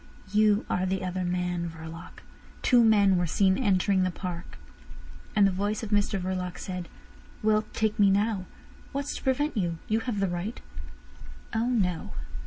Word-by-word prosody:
"You 210 0 +3
are 185 +1 0
the 190 0 -1
other 185 0 -2
man, 180 -1 -1
Verloc. 165 +1 -10 0.4
Two 245 -2 +5
men 200 -4 +5
were 175 -1 +1
seen 190 +3 +3
entering 195 -4 +2
the 185 - +2
park." 175 -1 -6 0.8
And 205 -2 +6
the 195 - +4
voice 205 +4 -1
of 220 - -5
Mr 205 -1 +2
Verloc 180 -1 -3
said: 180 -2 -5 0.6
"Well, 215 0 +3
take 220 -1 0
me 200 -1 +6
now. 200 -1 +1 0.5
What's 280 +1 -2
to - - -10
prevent 290 +3 +1
you? 175 -5 -1
You 220 +1 +2
have 225 -3 -3
the 195 - +2
right." 175 +6 -4 0.9
"Oh 225 +2 +1
no! 180 - 0
195 Hz, 165 wpm, -28 LUFS, 180-215 Hz, 0.9 s, And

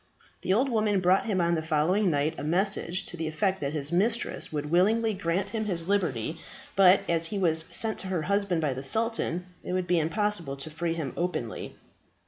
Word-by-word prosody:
The - - -1
old 240 +8 +3
woman 215 -4 +1
brought 185 +4 +3
him 200 -4 0
on 170 0 +2
the 160 - 0
following 165 +6 +1
night 150 0 +1
a - - -5
message 185 +2 0
to 175 - -6
the 160 -1 -3
effect 185 +5 0
that 140 0 -2
his 150 0 -1
mistress 220 +7 0
would 150 0 -4
willingly 220 +6 +3
grant 185 0 -1
him 220 -1 -3
his 175 -5 -3
liberty, 165 - -1 0.4
but 195 0 +6
as 165 -1 +1
he 205 - -4
was 160 -4 +1
sent 220 -1 0
to 190 - -3
her 180 -4 -1
husband 200 -1 0
by 145 -4 0
the 130 +1 -6
sultan, 200 - +1 0.2
it - - -4
would 185 -1 0
be 175 -1 +2
impossible 165 -3 -1
to 155 +3 -5
free 165 +1 -2
him 155 -5 -4
openly. 170 -10 -3
175 Hz, 205 wpm, -27 LUFS, 160-200 Hz, 0.4 s, but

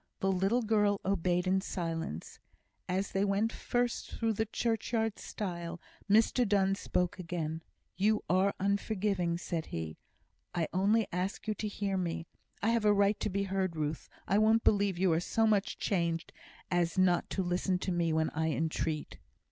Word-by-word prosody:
The 195 - +1
little 195 +6 +2
girl 210 -2 +2
obeyed 180 -2 +1
in 190 +1 +2
silence. 165 - -4 0.5
As 190 +2 -1
they 195 - +1
went 205 +3 +1
first 245 0 -1
through 225 -1 -1
the 220 +1 -1
churchyard 225 -1 -1
stile, 175 -4 -5 0.3
Mr 225 +4 +4
Donne 195 -1 +3
spoke 180 -2 -1
again. 165 -2 -3 0.4
"You 210 +3 +2
are 190 +3 +2
unforgiving," 200 -3 0
said 170 -2 -3
he. 80 -1 -5 0.6
"I 165 -3 +1
only 205 +4 +3
ask 185 +5 -2
you 215 - +1
to 210 +1 -4
hear 200 -1 -2
me. 170 -2 -2 0.4
I 220 - +3
have 230 -1 +2
a 210 - +5
right 200 0 +3
to - - -1
be 200 +1 -1
heard, 190 -3 -1
Ruth! 155 0 -3 0.2
I 200 - +3
won't 220 +1 +4
believe 200 -3 +3
you 180 -2 +3
are 160 - +2
so 225 +5 +1
much 210 -2 +1
changed, 170 -3 -1 0.4
as 175 0 +1
not 180 -2 +3
to 190 - -1
listen 180 +1 0
to 185 - -3
me 170 -2 +1
when 160 0 +1
I 160 +1 0
entreat." 155 -1 -2
190 Hz, 170 wpm, -32 LUFS, 175-210 Hz, 0.6 s, a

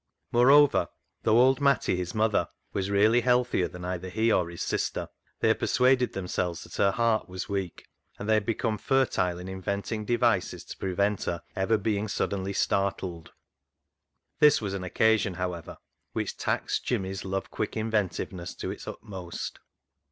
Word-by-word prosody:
Moreover, 135 +4 +6 0.3
though 110 - +3
old 130 +2 +5
Matty 140 -8 +3
his 90 +1 -4
mother 110 -1 +2 0.3
was 100 0 -1
really 105 +4 +4
healthier 125 -6 +2
than 90 0 -9
either 90 0 -4
he 110 +4 +1
or 90 -5 +2
his 85 - -5
sister, - - -2 0.3
they - - +4
had - - +2
persuaded 125 0 +3
themselves 90 -2 -2
that - - -10
her 100 - +4
heart 115 0 +1
was 95 +5 -5
weak, 100 -4 -4 0.3
and 105 - -6
they 110 - +4
had 110 -1 +3
become 115 -1 -1
fertile 120 -10 +1
in 90 +1 -8
inventing 100 +3 -3
devices 120 -4 +1
to - - -9
prevent 100 +2 0
her 85 -1 -3
ever 105 +3 +2
being 105 0 -1
suddenly 100 -1 -2
startled. 95 -4 -1 1.1
This 150 -1 +6
was 100 -3 -3
an 95 -2 -4
occasion, 105 +1 +2
however, 90 -2 -4 0.4
which - - -2
taxed - - -1
Jimmy's 95 0 -2
love 95 0 -3
quick 110 - -3
inventiveness 100 -4 -2
to - - -4
its - - -9
utmost. 95 -5 -6
100 Hz, 160 wpm, -28 LUFS, 95-115 Hz, 1.1 s, Moreover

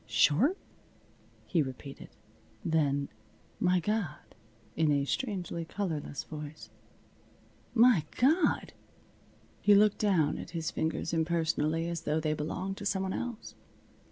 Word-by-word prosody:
"Short?" 250 - +3 0.9
he 170 - +2
repeated. 135 0 -7 0.6
Then, 145 -4 +1 0.5
"My 180 0 +3
God!" 210 -3 -3 0.4
in 160 -2 +3
a 140 -1 +2
strangely 185 - -2
colorless 160 -5 -3
voice 150 0 -8 1.0
"My 230 -8 +6
God!" 305 +5 +3 0.9
He 205 - +6
looked 210 0 +4
down 185 -8 +2
at - - -7
his 160 -1 -2
fingers 160 +1 -2
impersonally, 165 -1 +1
as 170 -2 -3
though 150 0 0
they 155 -1 0
belonged 185 +6 -3
to 205 - -7
some 190 -1 0
one 190 - -2
else. 240 -3 -5
165 Hz, 120 wpm, -30 LUFS, 155-200 Hz, 1.0 s, My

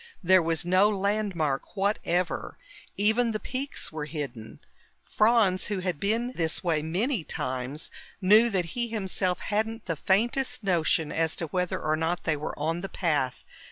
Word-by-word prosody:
There 185 +1 +6
was 165 0 -1
no 185 +4 +4
landmark 200 -7 -1
whatever; 185 -3 -1 0.4
even 220 +3 +2
the 215 - -2
peaks 270 +5 -3
were 155 -2 -4
hidden. 140 -8 -6 0.4
Franz, 210 -4 +2
who 205 - -2
had 180 -4 -2
been 230 +5 0
this 165 -8 -1
way 165 -4 +1
many 190 - 0
times, 130 +2 -4 0.3
knew 215 +4 +6
that 190 -5 0
he 240 -1 -1
himself 190 -4 -1
hadn't 220 +2 -2
the 165 - -2
faintest 230 - +1
notion 165 -4 +1
as 160 -1 0
to 165 - -2
whether 180 +2 -1
or 155 0 0
not 165 +2 -1
they 160 - +1
were 150 +1 -5
on 165 +3 -1
the 195 - -5
path. 145 -8 -1
185 Hz, 160 wpm, -27 LUFS, 160-215 Hz, 0.4 s, There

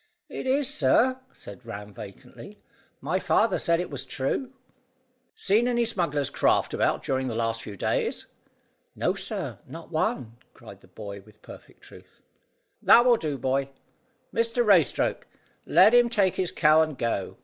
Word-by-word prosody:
"Is 265 - -6
it, 275 +3 +2
sir?" 260 -3 +2
said 100 +5 -12
Ram 105 -3 -9
vacantly. 100 0 -12 0.4
"My - - -1
father - - +1
said 170 0 +1
it 180 - -4
was 135 -2 -5
true." 145 - -3 0.8
"Seen 215 +5 +2
any 240 -1 +1
smugglers' 165 - -1
craft - - +1
about - - 0
during 130 -1 -1
the 115 - -4
last 115 0 -2
few 100 -2 -9
days?" - - -2 0.7
"No, - - 0
sir; - - -5
not - - -11
one," 115 -1 -2 0.2
cried 100 -5 -14
the - - -20
boy 100 +1 -9
with 105 +1 -22
perfect - - -14
truth. - - -16 0.6
"That 240 - +6
will 245 -2 +5
do, 150 -6 -3
boy. 135 +1 -1 0.6
Mr 230 +1 +1
Raystoke 180 - +2 0.4
let 190 +7 +6
him 240 -1 +5
take 200 -6 +2
his 185 -2 -1
cow 155 0 +4
and 155 -3 -2
go." 115 -5 -3
150 Hz, 155 wpm, -26 LUFS, -, 0.8 s, That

